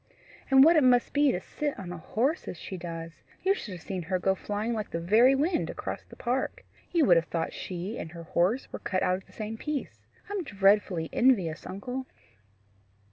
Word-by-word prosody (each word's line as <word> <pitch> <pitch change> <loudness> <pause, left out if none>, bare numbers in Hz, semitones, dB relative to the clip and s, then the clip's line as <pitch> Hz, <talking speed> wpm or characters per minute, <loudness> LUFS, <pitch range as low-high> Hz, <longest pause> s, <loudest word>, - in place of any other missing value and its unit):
And 270 0 +8
what 330 +3 +7
it 300 - +5
must 245 -1 +4
be 290 -1 +4
to 180 - -1
sit 290 +8 -4
on 180 -3 -7
a 180 - -6
horse 260 - -1
as - - -5
she 190 - -7
does! 165 -2 -7 0.2
You 385 +2 +4
should 225 - -6
have 175 - -11
seen 190 -2 -4
her 185 +3 -1
go 190 +1 +2
flying 210 +4 -3
like 215 -2 -3
the 165 - -3
very 225 +10 +5
wind 325 +5 +1
across - - -5
the - - -14
park! 255 +2 -2 0.3
You 335 -4 +4
would 175 -7 +6
have 165 0 +1
thought 165 -1 -2
she 185 +5 -5
and 160 - -6
her 170 -1 -8
horse 180 +9 +1
were - - -4
cut 185 -1 -1
out 185 - +2
of 190 - -14
the - - -19
same 220 +1 -5
piece. 300 -2 -5 0.2
I'm 405 -2 -3
dreadfully 195 - +2
envious, 195 -11 +2
uncle." 250 +8 -5
205 Hz, 210 wpm, -28 LUFS, 180-265 Hz, 0.3 s, And